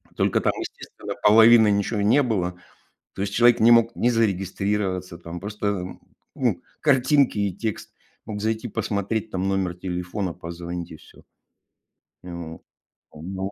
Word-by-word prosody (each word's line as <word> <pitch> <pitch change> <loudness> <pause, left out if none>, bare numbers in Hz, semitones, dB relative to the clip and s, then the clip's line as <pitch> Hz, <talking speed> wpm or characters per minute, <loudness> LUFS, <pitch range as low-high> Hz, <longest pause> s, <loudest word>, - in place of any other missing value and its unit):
Только - - +1
там, - - +1
естественно, - - -7
половины 110 +1 +7
ничего 100 +1 0
не 115 +8 +4
было. 90 -7 -1 0.6
То - - -6
есть 100 0 -2
человек 120 +2 +5
не 115 +2 +6
мог 115 0 +5
ни 120 - +1
зарегистрироваться, 95 -4 -1
там, 85 +1 -8
просто, 100 -2 -3 0.5
ну, - - 0 0.2
картинки 135 -3 +3
и 100 -3 0
текст. 110 +2 -5 0.3
Мог 105 -1 -5
зайти, 110 +2 -2
посмотреть, 105 +2 -2
там, 95 +1 -2
номер 95 -2 0
телефона, 90 +1 -4
позвонить 85 0 -7
и 80 - -9
всё. - - -19 1.0
Ну 85 -2 -8 0.5
вот. 95 +5 -5
100 Hz, 140 wpm, -24 LUFS, 90-110 Hz, 1.0 s, половины